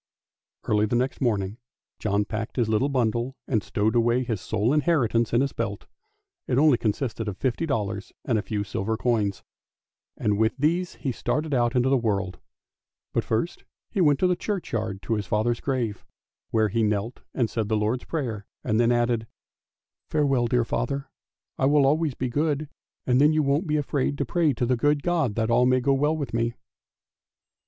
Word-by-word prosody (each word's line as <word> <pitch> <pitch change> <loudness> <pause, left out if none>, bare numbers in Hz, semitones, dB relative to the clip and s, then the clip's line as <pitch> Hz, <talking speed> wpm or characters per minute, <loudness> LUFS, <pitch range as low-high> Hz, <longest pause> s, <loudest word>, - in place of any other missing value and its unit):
Early 105 0 +2
next 125 +5 -1
morning 105 -4 0 0.4
John 105 -1 +1
packed 110 +2 -4
his 120 -4 +1
little 110 +6 +2
bundle 120 0 0
and 110 -5 +1
stowed 110 +2 0
away 120 +2 +3
his 115 -6 -3
sole 110 +7 0
inheritance 135 -8 +2
in 120 - +3
his 140 0 -1
belt; 105 -3 -3 0.6
it 125 - +1
only 145 -4 +5
consisted 115 0 -2
of 100 -2 -4
fifty 135 +5 -1
dollars 105 -5 -2
and 115 -4 +2
a - - -1
few 105 +1 -2
silver 105 +2 -2
coins, 110 -5 0 0.7
and 105 -1 0
with 110 +3 +2
these 170 +5 0
he 135 - -3
started 150 +5 -2
out 120 0 +2
into 125 +1 +3
the 135 -1 +3
world. 100 -5 -1 0.7
But - - +1
first 115 +10 -2 0.3
he 200 - 0
went 145 -4 +5
to - - +4
the 180 - +2
churchyard 115 - -3
to 115 - -1
his 105 -4 -2
father's 110 +4 +1
grave, 120 -7 -2 0.5
where 110 -1 +2
he 115 +3 0
knelt 105 +2 -1
and 120 -4 +2
said 110 0 -2
the 110 - +2
Lord's 110 +4 -1
prayer, 115 -10 -3 0.2
and 110 -2 +1
then 120 0 +4
added, 120 -1 +1 0.4
" - - -64
Farewell, 135 -5 +2
dear 120 0 +2
father! 140 +3 -2 0.5
I 135 - +3
will 145 -1 +4
always 150 0 +2
be 130 - -2
good, 145 +3 -1 0.4
and 125 +1 +3
then 150 +2 +5
you 155 0 +2
won't 145 +6 +1
be 150 0 +1
afraid 145 -1 -1
to 140 - -1
pray 160 +2 +2
to 120 +1 -1
the 125 +1 +2
good 145 +4 +1
God 165 -11 +1
that 110 0 0
all 125 +2 +4
may 130 0 +4
go 135 +2 +2
well 150 +3 +1
with 145 -5 -4
me! 115 0 0
120 Hz, 190 wpm, -25 LUFS, 110-140 Hz, 0.7 s, only